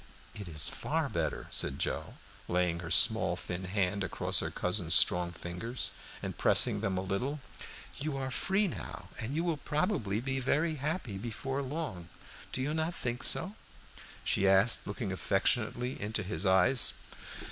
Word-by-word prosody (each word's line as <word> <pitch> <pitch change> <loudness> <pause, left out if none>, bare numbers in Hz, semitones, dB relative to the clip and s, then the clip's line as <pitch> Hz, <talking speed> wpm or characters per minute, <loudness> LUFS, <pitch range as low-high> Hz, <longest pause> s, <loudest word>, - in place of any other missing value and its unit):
"It 100 -2 -7
is 75 -4 -1
far - - -2
better," - - -2
said - - 0
Joe, - - -2 0.3
laying 90 -1 0
her 85 -2 -7
small, 90 0 +5
thin 90 +1 -5
hand 100 +1 -1
across - - +2
her - - -2
cousin's - - +3
strong 90 0 +7
fingers 100 +6 -5 0.3
and - - -4
pressing - - +4
them 95 -1 -1
a - - 0
little. 125 +10 -2 0.6
"You 145 -1 -3
are 130 -1 -3
free 195 +9 +1
now, 170 - -7
and 125 +4 -4
you 165 - 0
will 170 -3 0
probably 150 - -1
be 135 +2 -2
very 155 +5 0
happy 140 - -3
before 135 +5 -4
long. 130 - -5 0.4
Do 130 - -2
you 145 +3 -1
not 160 +2 -1
think 120 0 -3
so?" 185 +4 +1 0.7
she 95 - +2
asked, 95 +4 +4
looking 105 0 -4
affectionately 120 +6 0
into 105 0 -2
his 90 0 -2
eyes. 95 +8 +4
110 Hz, 160 wpm, -31 LUFS, 95-140 Hz, 0.7 s, strong